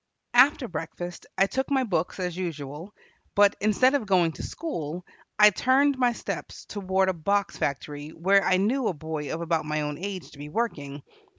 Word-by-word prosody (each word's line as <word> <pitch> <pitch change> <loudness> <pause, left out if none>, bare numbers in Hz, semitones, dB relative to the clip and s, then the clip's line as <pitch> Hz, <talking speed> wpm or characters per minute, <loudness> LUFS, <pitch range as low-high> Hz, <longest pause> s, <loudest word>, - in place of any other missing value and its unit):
After 255 +1 +5
breakfast 175 0 -6
I 195 - +5
took 265 +6 -2
my 270 -2 +2
books, 180 -5 -1
as 180 -2 -2
usual, 165 0 -5 0.4
but, 205 0 +5
instead 215 +6 +4
of 265 -7 0
going 180 -4 +3
to - - -9
school, 175 - -5 0.3
I 210 0 +8
turned 270 +6 +3
my 250 -2 +2
steps - - -6
toward 190 -2 0
a 190 - +2
box 200 +4 0
factory 145 +1 -3
where 195 +5 +3
I 185 - +3
knew 230 +6 +1
a 180 - -1
boy 155 -1 -5
of 165 - -3
about 165 -2 0
my 155 0 -1
own 150 0 -4
age 185 -6 -5
to 140 - -15
be 145 +1 -7
working. 145 -9 -3
185 Hz, 185 wpm, -26 LUFS, 155-215 Hz, 0.4 s, I